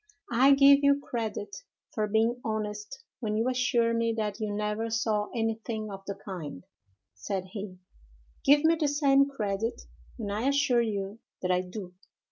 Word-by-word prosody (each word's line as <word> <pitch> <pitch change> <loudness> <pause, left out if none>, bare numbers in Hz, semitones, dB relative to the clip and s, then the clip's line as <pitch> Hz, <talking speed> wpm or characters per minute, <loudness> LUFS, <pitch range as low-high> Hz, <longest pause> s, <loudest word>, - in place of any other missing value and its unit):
"I 265 +4 +6
give 280 0 +7
you 280 0 +4
credit 215 -6 -4 0.4
for 215 -1 0
being 225 +3 +1
honest 210 -2 -4 0.2
when 215 -3 -1
you 225 +3 +1
assure 250 -2 +2
me 230 0 +1
that 210 -1 -2
you 215 -1 -2
never 210 +2 -2
saw 220 -2 0
anything 225 -1 -2
of 195 0 -7
the 200 - -3
kind," 175 - -7 0.5
said 180 - -4
he; 195 -3 -6 0.7
"give 290 +2 +5
me 330 +1 +4
the 305 - +2
same 280 -1 +4
credit 220 -3 -2 0.3
when 210 -4 -4
I 215 +6 -1
assure 280 -4 +3
you 205 -1 -3 0.2
that 180 - +1
I 180 0 +3
do." 180 0 -8
220 Hz, 160 wpm, -28 LUFS, 205-250 Hz, 0.7 s, give